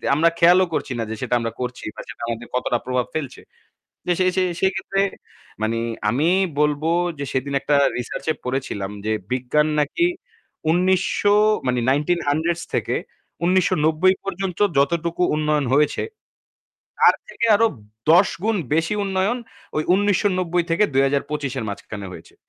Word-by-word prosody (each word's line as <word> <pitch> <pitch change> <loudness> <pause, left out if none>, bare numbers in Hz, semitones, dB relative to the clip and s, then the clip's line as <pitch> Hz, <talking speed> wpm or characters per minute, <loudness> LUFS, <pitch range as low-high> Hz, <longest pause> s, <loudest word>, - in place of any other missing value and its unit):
আমরা 165 +3 +4
খেয়ালও 180 +2 +6
করছি 140 - -2
না - - 0
যে 110 - -3
সেটা 125 -1 0
আমরা 115 0 -3
করছি 125 0 -5
বা - - -7
সেটা - - -10
আমাদের 115 0 -4
কতটা 125 -1 +1
প্রভাব 125 -1 0
ফেলছে। 150 -5 -4 0.7
যে 180 - +2
সে 185 - +3
সে 185 - +3 0.2
সেইক্ষেত্রে 190 +1 0 0.6
মানে 115 +1 0 0.3
আমি 140 +8 +1 0.3
বলব 150 0 +1 0.4
যে, 140 - -3
সেদিন 135 +2 -2
একটা 145 +1 +2 0.2
রিসার্চে 135 +5 -3
পড়েছিলাম 125 -7 -3 0.2
যে 110 - +1 0.2
বিজ্ঞান 130 +4 +1
নাকি 150 - +1 0.6
১৯০০ 185 +3 +2 0.3
মানে 125 0 +1
1900s 160 +2 0
থেকে - - 0 0.5
১৯৯০ 175 -1 +3
পর্যন্ত 195 -2 -4 0.2
যতটুকু 170 +5 +1
উন্নয়ন 150 -1 +1
হয়েছে, 150 +1 +2 1.0
তার - - +6
থেকে 485 - -2
আরো 225 +2 +4 0.4
১০ 180 +4 +6 0.2
গুণ 220 +1 +1 0.2
বেশি 165 +5 +1
উন্নয়ন 195 +4 0 0.4
ওই 155 - +1
১৯৯০ 185 -3 +1
থেকে 175 +6 +3
২০২৫ 140 +1 0
-এর 120 - -3
মাঝখানে 100 0 -7
হয়েছে। - - -13
155 Hz, 140 wpm, -22 LUFS, 130-185 Hz, 1.0 s, খেয়ালও